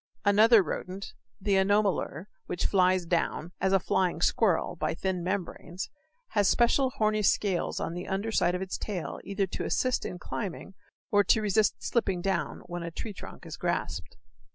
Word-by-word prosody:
Another 210 Hz, +1 st, +6 dB
rodent, 185 Hz, +4 st, -5 dB, 0.3 s
the 200 Hz, 0 st, 0 dB
anomalure, 195 Hz, -4 st, +1 dB, 0.2 s
which 175 Hz, -, -2 dB
flies 185 Hz, -2 st, +3 dB
down, 170 Hz, 0 st, -1 dB
as 190 Hz, -, +2 dB
a 195 Hz, -, +5 dB
flying 185 Hz, -2 st, 0 dB
squirrel, 185 Hz, 0 st, +2 dB
by -, -, -2 dB
thin 185 Hz, 0 st, -2 dB
membranes, 185 Hz, -1 st, -4 dB, 0.4 s
has 205 Hz, -2 st, +2 dB
special 250 Hz, +4 st, +3 dB
horny 215 Hz, -1 st, +2 dB
scales 195 Hz, -2 st, +1 dB
on 165 Hz, -, -3 dB
the 175 Hz, +1 st, -5 dB
under 200 Hz, +4 st, -2 dB
side 175 Hz, -4 st, +2 dB
of 180 Hz, -, -2 dB
its 190 Hz, -, -4 dB
tail 190 Hz, -6 st, -4 dB
either 200 Hz, 0 st, -1 dB
to 190 Hz, -, -5 dB
assist 255 Hz, -1 st, +1 dB
in 180 Hz, -, -5 dB
climbing 195 Hz, +1 st, -5 dB, 0.4 s
or 205 Hz, 0 st, +5 dB
to 220 Hz, -, +4 dB
resist 210 Hz, +1 st, +2 dB
slipping 195 Hz, -6 st, 0 dB
down 195 Hz, +2 st, -1 dB
when 175 Hz, 0 st, -5 dB
a 170 Hz, -, -4 dB
tree 210 Hz, +6 st, -6 dB
trunk -, -, -10 dB
is -, -, -7 dB
grasped. -, -, -3 dB
190 Hz, 170 wpm, -29 LUFS, 180-210 Hz, 0.4 s, Another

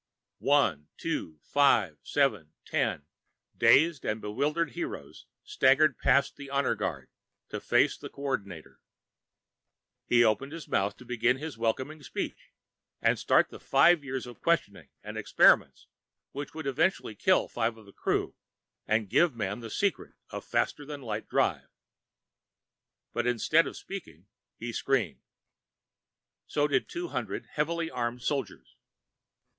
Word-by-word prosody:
One, 115 Hz, -, +2 dB
two, 80 Hz, -1 st, -3 dB
five, 115 Hz, -, +3 dB
seven, 110 Hz, -, 0 dB
ten 70 Hz, -, -1 dB, 0.5 s
dazed 160 Hz, -1 st, +4 dB
and 110 Hz, +1 st, -1 dB
bewildered 145 Hz, +11 st, -1 dB
"heroes" 340 Hz, 0 st, -7 dB, 0.2 s
staggered 410 Hz, -, +3 dB
past 140 Hz, +1 st, +3 dB
the 140 Hz, -1 st, -9 dB
honor 140 Hz, 0 st, +1 dB
guard, -, -, -4 dB, 0.4 s
to -, -, -5 dB
face -, -, +3 dB
the -, -, -8 dB
Co 140 Hz, -, -11 dB
ordinator. 100 Hz, -, -4 dB, 1.3 s
He 120 Hz, -1 st, +5 dB
opened 125 Hz, +6 st, +1 dB
his 165 Hz, -1 st, -8 dB
mouth 100 Hz, +1 st, 0 dB
to 125 Hz, -, -14 dB
begin 125 Hz, +1 st, +1 dB
his 155 Hz, +2 st, -6 dB
welcoming 130 Hz, +7 st, -2 dB
speech, 140 Hz, -, -6 dB, 0.5 s
and -, -, +2 dB
start -, -, +3 dB
the -, -, -10 dB
five 150 Hz, +4 st, +4 dB
years 135 Hz, -2 st, -4 dB
of 120 Hz, -3 st, -12 dB
questioning 100 Hz, -, 0 dB
and -, -, -6 dB
experiments -, -, +4 dB, 0.5 s
which 145 Hz, +2 st, -7 dB
would 160 Hz, -2 st, -6 dB
eventually 135 Hz, -, 0 dB
kill 185 Hz, -, +2 dB
five 115 Hz, -1 st, -1 dB
of 110 Hz, -, -15 dB
the 100 Hz, -, -16 dB
crew -, -, -1 dB, 0.5 s
and 110 Hz, -1 st, +1 dB
give 145 Hz, -, +3 dB
Man 100 Hz, -2 st, -3 dB
the 115 Hz, -1 st, -8 dB
secret 200 Hz, -, -1 dB, 0.2 s
of -, -, -6 dB
faster 145 Hz, -, -1 dB
than 145 Hz, -1 st, -8 dB
light 110 Hz, -2 st, -4 dB
drive. -, -, +1 dB, 1.5 s
But -, -, -1 dB
instead 125 Hz, +7 st, +3 dB
of -, -, -7 dB
speaking, 95 Hz, -, -9 dB, 0.3 s
he 120 Hz, +1 st, -5 dB
screamed. 120 Hz, -, 0 dB, 1.3 s
So 145 Hz, 0 st, +1 dB
did 135 Hz, -3 st, 0 dB
two 350 Hz, 0 st, -4 dB
hundred -, -, -4 dB
heavily 170 Hz, -1 st, -1 dB
armed 120 Hz, 0 st, -3 dB
soldiers. 105 Hz, -, -3 dB
130 Hz, 140 wpm, -29 LUFS, 110-150 Hz, 1.5 s, He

